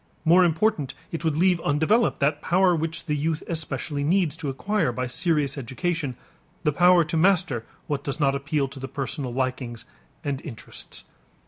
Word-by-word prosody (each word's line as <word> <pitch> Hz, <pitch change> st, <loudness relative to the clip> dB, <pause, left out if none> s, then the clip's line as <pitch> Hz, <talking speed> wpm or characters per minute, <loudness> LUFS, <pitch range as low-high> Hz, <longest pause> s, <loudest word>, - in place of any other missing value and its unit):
More 175 Hz, +3 st, +6 dB
important, 165 Hz, -4 st, +1 dB, 0.2 s
it 165 Hz, -, -4 dB
would 160 Hz, -2 st, +1 dB
leave 180 Hz, 0 st, +3 dB
undeveloped 160 Hz, +11 st, +2 dB
that 145 Hz, +1 st, +2 dB
power 180 Hz, 0 st, +3 dB
which 165 Hz, 0 st, -3 dB
the 150 Hz, -3 st, 0 dB
youth 155 Hz, +2 st, -1 dB
especially 150 Hz, -3 st, -2 dB
needs 170 Hz, 0 st, +2 dB
to 145 Hz, -, -3 dB
acquire 200 Hz, +3 st, 0 dB
by 125 Hz, +2 st, -2 dB
serious 145 Hz, +1 st, 0 dB
education, 140 Hz, +2 st, -2 dB, 0.5 s
the 150 Hz, -, +3 dB
power 180 Hz, +1 st, +6 dB
to 160 Hz, +2 st, -4 dB
master 160 Hz, -, +2 dB, 0.2 s
what 145 Hz, -2 st, -2 dB
does 140 Hz, +2 st, -3 dB
not 140 Hz, -2 st, +3 dB
appeal 140 Hz, 0 st, 0 dB
to 135 Hz, -, -9 dB
the 135 Hz, -, -5 dB
personal 135 Hz, -1 st, -4 dB
likings 125 Hz, -2 st, -3 dB, 0.4 s
and 140 Hz, -1 st, -2 dB
interests. 125 Hz, -8 st, -9 dB
150 Hz, 165 wpm, -25 LUFS, 135-170 Hz, 0.5 s, More